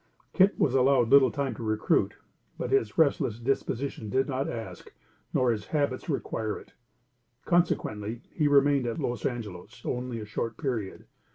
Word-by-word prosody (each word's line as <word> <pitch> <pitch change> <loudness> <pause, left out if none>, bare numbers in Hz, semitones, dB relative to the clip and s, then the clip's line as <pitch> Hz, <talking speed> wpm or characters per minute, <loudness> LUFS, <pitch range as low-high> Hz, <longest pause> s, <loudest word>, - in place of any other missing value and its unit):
Kit 195 +1 +4
was 130 - +2
allowed 130 -2 +4
little 135 -2 +7
time 140 -3 -2
to - - -9
recruit, 110 -1 +1 0.4
but 125 - -3
his 115 -6 +1
restless 140 -8 +2
disposition 125 -2 -2
did 130 +5 +1
not 135 -1 -2
ask, 95 -7 -7 0.4
nor 125 -1 +2
his 105 -3 -3
habits 145 -1 -1
require 110 -6 -2
it; - - -14 0.7
consequently, 120 - 0
he 150 -3 +2
remained 140 -2 +4
at 115 - -2
Los 120 -3 -1
Angelos 110 -3 -7
only 125 -1 -3
a 105 - -6
short 110 +1 -4
period. 115 -8 -3
125 Hz, 155 wpm, -28 LUFS, 110-140 Hz, 0.7 s, little